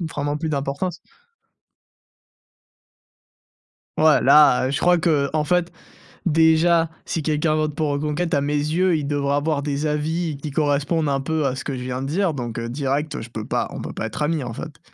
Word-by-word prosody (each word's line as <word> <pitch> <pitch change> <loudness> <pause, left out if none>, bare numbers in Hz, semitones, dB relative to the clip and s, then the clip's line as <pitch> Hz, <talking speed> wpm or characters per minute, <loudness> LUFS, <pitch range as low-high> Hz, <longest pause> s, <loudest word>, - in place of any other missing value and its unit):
vraiment 145 -3 -3
plus 160 +1 -3
d'importance. 145 +5 -2 3.0
Ouais 155 -1 +5
là, 145 -4 +6
heu, - - -2
je 140 - -1
crois 175 0 +4
qu'en 155 -2 +1
fait 175 +3 +1 0.6
déjà 165 +1 +4 0.2
si 165 - -2
quelqu'un 155 +1 +1
vote 155 -1 -1
pour 155 -1 -1
Reconquête 150 +4 -1
à 140 - +2
mes 145 +1 -1
yeux, 160 +4 +1
il 145 -2 -3
devrait 140 -1 0
avoir 145 0 0
des 145 +1 -2
avis 155 +1 -1
qui 145 +2 -6
correspondent 145 +2 0
un 135 -1 0
peu 155 +1 -1
à 130 0 -1
ce - - -6
que 140 - -3
je 125 - -6
viens 130 +1 -4
de 135 - -3
dire, 175 +1 0
donc, 120 -4 -5
heu, 115 0 -3
direct, 145 +3 -2
heu, - - -5
je 115 - -10
peux 110 -2 -6
pas, - - -1
on - - -6
peut - - -6
pas - - -3
être - - -7
ami 150 -2 0
en 120 - -5
fait. - - -8
150 Hz, 195 wpm, -22 LUFS, 140-160 Hz, 3.0 s, là